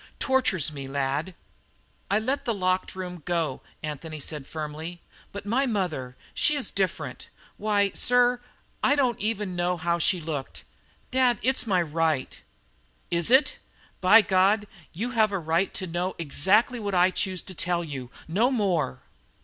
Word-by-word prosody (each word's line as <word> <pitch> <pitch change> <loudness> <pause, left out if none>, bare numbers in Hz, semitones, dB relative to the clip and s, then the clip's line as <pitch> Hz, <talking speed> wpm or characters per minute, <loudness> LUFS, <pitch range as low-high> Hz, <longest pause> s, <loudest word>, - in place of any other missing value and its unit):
"Tortures 195 - +2
me, 135 -2 -6
lad!" 140 +6 -2 0.7
"I 200 - +3
let 260 +6 -1
the 230 - 0
locked 185 -1 0
room 180 -2 -6
go," 165 -5 -1 0.2
said - - -2
Anthony 155 +1 -6
firmly, 155 +3 -5 0.3
"but 200 0 -7
my 255 +6 +1
mother 155 - -2 0.2
she 300 - +3
is 285 - -1
different. 165 -9 -2 0.3
Why, 205 -2 +2
sir, 245 0 +3 0.4
I 285 - +4
don't 255 -5 +1
even 210 -3 -2
know 175 0 0
how 170 +1 0
she 180 +2 +2
looked! 155 -4 -5 0.5
Dad, 255 -2 +3
it's 255 0 +2
my 185 -4 +3
right!" 160 -3 -1 0.7
"Is 170 +2 +1
it? 265 +3 +4 0.4
By 210 +5 +8
God, 195 +3 +3 0.3
you 230 +9 -3
have 220 -3 +3
a 195 - 0
right 165 +2 0
to 190 - -2
know 175 +2 -2
exactly 190 - +2
what 200 -3 -2
I 180 +1 +5
choose 185 -1 -1
to 190 - -7
tell 175 0 0
you 135 -6 -6 0.2
no 210 +10 +2
more!" 175 - 0
185 Hz, 155 wpm, -26 LUFS, 160-215 Hz, 0.7 s, By